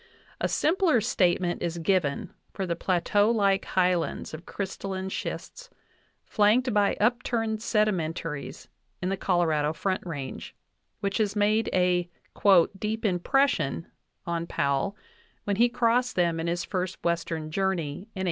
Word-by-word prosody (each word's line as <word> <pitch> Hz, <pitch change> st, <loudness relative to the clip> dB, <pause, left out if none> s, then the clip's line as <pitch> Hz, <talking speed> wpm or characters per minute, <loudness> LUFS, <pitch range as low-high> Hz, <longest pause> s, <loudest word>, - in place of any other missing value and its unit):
A -, -, +1 dB
simpler 330 Hz, -, +2 dB
statement 180 Hz, -5 st, +1 dB
is 170 Hz, 0 st, -2 dB
given 165 Hz, -4 st, 0 dB, 0.2 s
for 195 Hz, -, -3 dB
the 170 Hz, -2 st, -1 dB
plateau 190 Hz, +4 st, +2 dB
like 200 Hz, -4 st, +2 dB
highlands 180 Hz, -4 st, 0 dB
of 155 Hz, +3 st, -9 dB
crystalline 190 Hz, -1 st, -4 dB
schists, -, -, -6 dB, 0.6 s
flanked 225 Hz, +4 st, +3 dB
by 205 Hz, -1 st, +2 dB
upturned 225 Hz, -1 st, 0 dB
sedimentaries 165 Hz, -, -1 dB, 0.3 s
in 185 Hz, -, -2 dB
the 195 Hz, -, 0 dB
Colorado 160 Hz, -5 st, +1 dB
Front 190 Hz, +3 st, -2 dB
Range, 145 Hz, -6 st, -6 dB, 0.5 s
which 200 Hz, +1 st, -1 dB
had 210 Hz, -1 st, +1 dB
made 210 Hz, +2 st, +2 dB
a 180 Hz, -1 st, +2 dB, 0.7 s
"deep 220 Hz, +2 st, -2 dB
impression" 180 Hz, -, +1 dB, 0.3 s
on 170 Hz, 0 st, -2 dB
Powell 140 Hz, +8 st, 0 dB, 0.5 s
when 200 Hz, -1 st, -1 dB
he 240 Hz, +2 st, +5 dB
crossed 245 Hz, +1 st, +1 dB
them 170 Hz, -2 st, +1 dB
in 165 Hz, -, -2 dB
his 170 Hz, +1 st, -1 dB
first 185 Hz, -1 st, -3 dB
Western 165 Hz, -2 st, -2 dB
journey 190 Hz, -4 st, 0 dB
in 145 Hz, -, -7 dB, 0.2 s
1867. -, -, -6 dB
190 Hz, 135 wpm, -27 LUFS, 170-215 Hz, 0.7 s, he